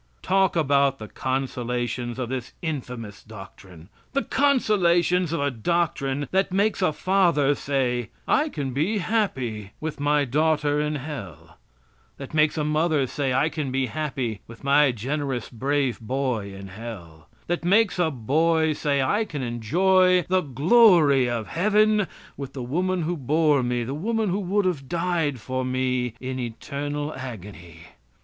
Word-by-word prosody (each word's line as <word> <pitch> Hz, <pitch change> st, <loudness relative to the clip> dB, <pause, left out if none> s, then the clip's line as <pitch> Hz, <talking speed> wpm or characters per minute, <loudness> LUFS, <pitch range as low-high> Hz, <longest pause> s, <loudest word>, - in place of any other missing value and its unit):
Talk 190 Hz, -1 st, +2 dB
about 140 Hz, -3 st, +2 dB
the 110 Hz, -, -8 dB
consolations 125 Hz, -2 st, -3 dB
of 125 Hz, -2 st, -3 dB
this 130 Hz, -1 st, -5 dB
infamous 125 Hz, -9 st, -5 dB
doctrine. 95 Hz, -5 st, -13 dB, 0.3 s
The 275 Hz, -, +1 dB
consolations 180 Hz, -, +2 dB
of 165 Hz, -, -1 dB
a 140 Hz, 0 st, +1 dB
doctrine 140 Hz, +1 st, -1 dB
that 190 Hz, 0 st, +1 dB
makes 200 Hz, +2 st, +1 dB
a 185 Hz, -, +3 dB
father 170 Hz, -4 st, +2 dB
say, 125 Hz, -4 st, -1 dB, 0.2 s
"I 305 Hz, +1 st, +2 dB
can 140 Hz, -, -4 dB
be 165 Hz, -, 0 dB
happy 130 Hz, -, -2 dB
with 155 Hz, -1 st, -5 dB
my 145 Hz, 0 st, +2 dB
daughter 150 Hz, +2 st, +1 dB
in 150 Hz, 0 st, -1 dB
hell"; 130 Hz, -, -8 dB, 0.6 s
that 135 Hz, +1 st, -9 dB
makes 155 Hz, 0 st, +3 dB
a 150 Hz, -, 0 dB
mother 155 Hz, -1 st, +1 dB
say, 135 Hz, +1 st, -2 dB
"I 135 Hz, +4 st, +2 dB
can 155 Hz, -5 st, -3 dB
be 135 Hz, 0 st, 0 dB
happy 130 Hz, -6 st, -3 dB
with 115 Hz, +3 st, -13 dB
my 140 Hz, 0 st, +4 dB
generous, 130 Hz, +1 st, -3 dB
brave 135 Hz, +1 st, -1 dB
boy 120 Hz, -3 st, -2 dB
in 95 Hz, 0 st, -9 dB
hell"; 90 Hz, -7 st, -10 dB, 0.2 s
that 175 Hz, 0 st, -2 dB
makes 200 Hz, +2 st, +3 dB
a 170 Hz, -2 st, +3 dB
boy 160 Hz, +5 st, +1 dB
say, 140 Hz, -2 st, 0 dB
"I 205 Hz, +11 st, +1 dB
can 150 Hz, -10 st, -5 dB
enjoy 180 Hz, -, +3 dB
the 185 Hz, +1 st, +1 dB
glory 150 Hz, -, +5 dB
of 115 Hz, -2 st, -2 dB
heaven 210 Hz, -, +2 dB, 0.3 s
with 140 Hz, -2 st, -7 dB
the 130 Hz, -, -5 dB
woman 180 Hz, +7 st, -1 dB
who 175 Hz, +3 st, -1 dB
bore 150 Hz, 0 st, +2 dB
me, 120 Hz, -1 st, -1 dB
the 130 Hz, +4 st, -4 dB
woman 220 Hz, +7 st, -1 dB
who 190 Hz, +3 st, 0 dB
would 200 Hz, +1 st, 0 dB
have 150 Hz, -8 st, -2 dB
died 165 Hz, -5 st, 0 dB
for 130 Hz, +3 st, -3 dB
me, 130 Hz, -2 st, -1 dB
in 130 Hz, 0 st, -4 dB
eternal 145 Hz, +5 st, -4 dB
agony." 100 Hz, -10 st, -9 dB
145 Hz, 155 wpm, -24 LUFS, 125-170 Hz, 0.6 s, glory